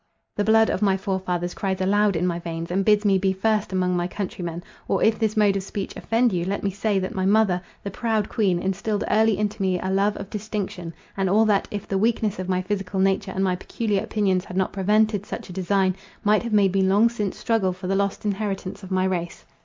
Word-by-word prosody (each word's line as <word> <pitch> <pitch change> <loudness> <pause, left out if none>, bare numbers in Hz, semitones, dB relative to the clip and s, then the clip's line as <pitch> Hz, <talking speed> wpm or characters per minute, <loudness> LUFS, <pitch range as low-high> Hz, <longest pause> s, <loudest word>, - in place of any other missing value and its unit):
The 205 - 0
blood 220 +1 +4
of - - -2
my 195 -2 +3
forefathers 185 -3 -2
cries 190 -2 -2
aloud 205 +1 +2
in 165 +2 0
my 170 -1 -1
veins, 165 0 -5
and 195 +2 +1
bids 210 +1 +3
me 195 -2 +4
be 190 0 +2
first 210 +1 0
among 180 -1 +1
my 175 0 0
countrymen. 175 -3 -5 0.2
Or, - - +1
if 220 0 +3
this 220 -1 0
mode 205 -2 +4
of 195 - 0
speech 195 +1 -5
offend 230 -1 +1
you, 175 -1 0
let 195 +3 -3
me 200 - 0
say, 200 +1 0
that 185 0 -2
my 190 0 0
mother, 200 -3 +3 0.2
the 200 - -4
proud 220 0 -1
queen, 195 -6 +1
instilled 195 +3 -2
early 220 -1 +3
into 210 -1 -2
me 185 -2 +1
a 190 - -2
love 200 +2 +1
of 200 0 -8
distinction, 205 -4 -4 0.2
and 195 -1 0
all 215 +4 +4
that, 205 -2 +2
if 205 -1 -5
the 195 - 0
weakness 215 -2 0
of 185 0 -4
my 185 0 0
physical 195 -1 -3
nature 195 0 +1
and 190 +1 -1
my 185 -1 +1
peculiar 205 +2 -2
opinions 190 -4 0
had 180 - -7
not 190 - 0
prevented 210 +1 +2
such 205 - -7
a - - -8
design, 190 0 +1 0.3
might 210 0 +3
have 235 - -5
made 200 -3 +3
me 195 - +2
long 195 +4 +4
since 210 -5 -3
struggle 220 -5 +1
for 185 +1 -8
the 190 - 0
lost 200 +1 -1
inheritance 200 -2 -3
of 190 - -10
my 185 -1 +1
race. 175 -2 -3
195 Hz, 235 wpm, -24 LUFS, 185-210 Hz, 0.3 s, blood